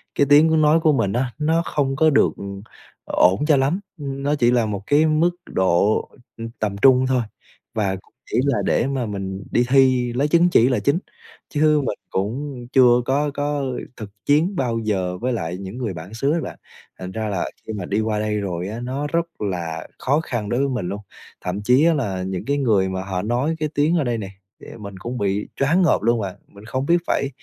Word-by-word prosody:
cái 140 - +3
tiếng 155 +2 +6
nói 155 +2 +5
của 155 -1 +4
mình 105 -7 0
á, 125 +1 -1
nó 160 +2 +2
không 135 -2 -1
có 160 +3 +4
được, 140 - +4
ừm, 100 0 -7 0.4
ổn 95 +10 +3
cho 150 -3 +5
lắm, 140 +8 +1 0.2
nó 140 0 -2
chỉ 120 -3 +3
là 120 -2 +2
một 100 -2 -4
cái 150 +2 +4
mức 155 +3 +3 0.2
độ, 95 +3 +2 0.4
ưm, 115 0 -6
tầm 105 -2 -1
trung 130 -1 +6
thôi, 130 -1 +2 0.5
và 100 -3 0 0.4
chỉ - - +2
là 140 - +2
để 120 - +2
mà 135 -3 -1
mình 100 -2 -5
đi 120 - +2
thi 130 -2 +4
lấy 135 +4 +1
chứng 170 +3 +4
chỉ 125 -7 +4
là 125 - +1
chính, 140 +5 +1 0.5
chứ 150 0 +3
mình 105 - -3
cũng 125 +6 -3
chưa 125 -2 +6
có 145 +3 +1
có 145 0 -1 0.3
thực 110 -3 -7 0.2
chiến 160 +7 +2
bao 120 -5 -1
giờ 95 -5 -1
với 125 +5 -1
lại 90 -5 -3
những 95 +4 -7
người 115 -6 -3
bản 85 +5 -9
xứ 135 +5 0
á 170 - +1
bạn. - - -7 0.4
Thành 95 0 -6
ra 110 +2 -3
là 95 -3 -2 0.2
khi 110 - -4
mà 100 -4 -4
đi 100 +4 -1
qua 110 -1 -1
đây 105 0 -1
rồi 90 -3 -3
á, 110 - -5
nó 130 +4 -3
rất 170 -1 -3
là 85 -5 -3
khó 145 +4 +1
khăn 120 -9 -4
đối 120 - 0
với 140 0 +1
mình 120 -9 -2
luôn, 100 +2 -5 0.4
thậm 90 +3 -3
chí 125 +7 +4
á 170 - +5
là 100 -11 -2
những 95 +1 -4
cái 140 +2 0
người 105 -9 +2
mà 95 0 -3
họ 95 -2 -3
nói 125 +10 0
cái 155 -1 -1
tiếng 155 +4 +2
ở 155 - +1
đây 120 -3 -1
nè, 100 -3 -5 0.5
mình 100 -2 -8
cũng 120 +5 -5
bị 100 -1 -1
choáng 160 +7 +2
ngợp 170 - +3
luôn 115 +1 +2
mà, 95 -3 -4
mình 100 +1 -15
không 130 +4 -2
biết 170 +3 +4
phải 140 - 0
120 Hz, 220 wpm, -22 LUFS, 100-145 Hz, 0.5 s, tiếng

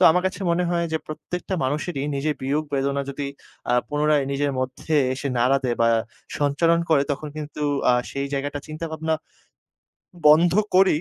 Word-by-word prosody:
তো - - +2
আমার 180 +2 +2
কাছে 190 - -4
মনে 175 +1 +2
হয় 170 -1 +1
যে 160 - +1
প্রত্যেকটা 180 +4 -5
মানুষেরই 145 +1 -2
নিজের 150 +2 0
বিয়োগ-বেদনা 140 -1 0
যদি 140 +1 -4 0.5
আ - - +3 0.2
পুনরায় 150 -1 +2
নিজের 140 0 0
মধ্যে 130 +4 -4 0.2
এসে 140 +2 -3
নাড়া 130 +3 +4
দেয় 120 -2 0
বা 115 - +5 0.5
সঞ্চারন 165 +4 +3
করে 145 -3 +5
তখন 150 +2 -5
কিন্তু 150 0 -6 0.3
আ - - +5 0.2
সেই 140 0 -2
জায়গাটা 145 +1 -2
চিন্তা-ভাবনা 160 0 -3 1.1
বন্ধ 160 +3 +7 0.2
করেই 185 -5 +5
150 Hz, 160 wpm, -23 LUFS, 140-160 Hz, 1.1 s, বন্ধ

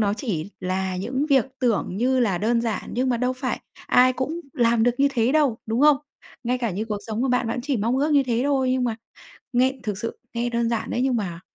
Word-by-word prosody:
nó 205 -1 +2
chỉ 200 - -3
là 185 0 -2
những 260 +9 -2
việc 275 -5 +4 0.2
tưởng 225 -6 0
như 255 +3 +2
là 195 -7 +1
đơn 230 +3 +1
giản 230 -2 -2
nhưng 255 +2 0
mà 245 - +2
đâu 250 +2 0
phải 255 0 -3 0.3
ai 255 +1 +5
cũng 295 +7 -3
làm 235 -2 +2
được 245 - +4
như 280 +1 +4
thế 240 -1 +1
đâu, 290 -7 +2
đúng 225 +3 0
không? 300 -1 +6 0.5
Ngay 250 +2 0
cả 235 -3 -1
như 195 +4 -3
cuộc 215 -2 -3
sống 220 +1 -2
của 265 - +1
bạn, 250 -1 +1
bạn 235 +2 -2
chỉ 275 -2 0
mong 230 +5 0
ước 295 +3 +1
như 285 -1 +5
thế 240 -3 0
thôi, 270 -3 +2
nhưng 255 -1 +1
mà 230 -2 -1 0.6
nghe 260 +2 +2
thực 210 -4 -3
sự 230 +3 -5 0.2
nghe 240 +1 -1
đơn 235 -1 0
giản 230 -1 -2
đấy - - -1
nhưng 260 -2 +2
mà 175 -6 -3
240 Hz, 250 wpm, -24 LUFS, 220-260 Hz, 0.6 s, không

